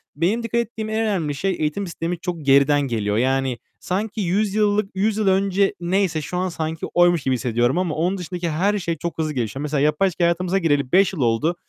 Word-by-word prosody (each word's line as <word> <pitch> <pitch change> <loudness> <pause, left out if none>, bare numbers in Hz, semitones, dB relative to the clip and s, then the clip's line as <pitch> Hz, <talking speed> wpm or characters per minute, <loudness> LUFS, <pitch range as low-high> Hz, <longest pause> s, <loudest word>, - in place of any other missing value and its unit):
benim 190 +10 0
dikkat 230 +1 0
ettiğim 220 -1 -6
en 220 0 -1
önemli 185 -10 -1
şey 190 +7 -1
eğitim 155 +6 -1
sistemi 170 0 -4
çok 170 -4 -5
geriden 140 +1 +4
geliyor. 110 -6 -1
Yani 130 +1 +1 0.2
sanki 210 +3 -3
100 195 +3 0
yıllık 210 -1 +2
100 205 +2 +1
yıl 215 -2 0
önce 195 +1 +2
neyse 175 -2 0
şu 180 - -5
an 185 +1 0
sanki 160 -1 -4
oymuş 175 -3 +4
gibi 130 - +1
hissediyorum 120 +4 0
ama 180 -4 -1
onun 180 +5 0
dışındaki 175 -1 -4
her 200 +7 +1
şey 170 -3 -3
çok 170 +3 -5
hızlı 155 -1 -1
gelişiyor. 125 0 -3
Mesela 150 -1 -1
yapay 150 +6 +2
zekâ 175 0 -3
hayatımıza 175 +2 +1
gireli 145 -7 +1
5 195 +1 +4
yıl 165 - -4
oldu. 120 +8 +1
175 Hz, 210 wpm, -22 LUFS, 145-195 Hz, 0.2 s, geriden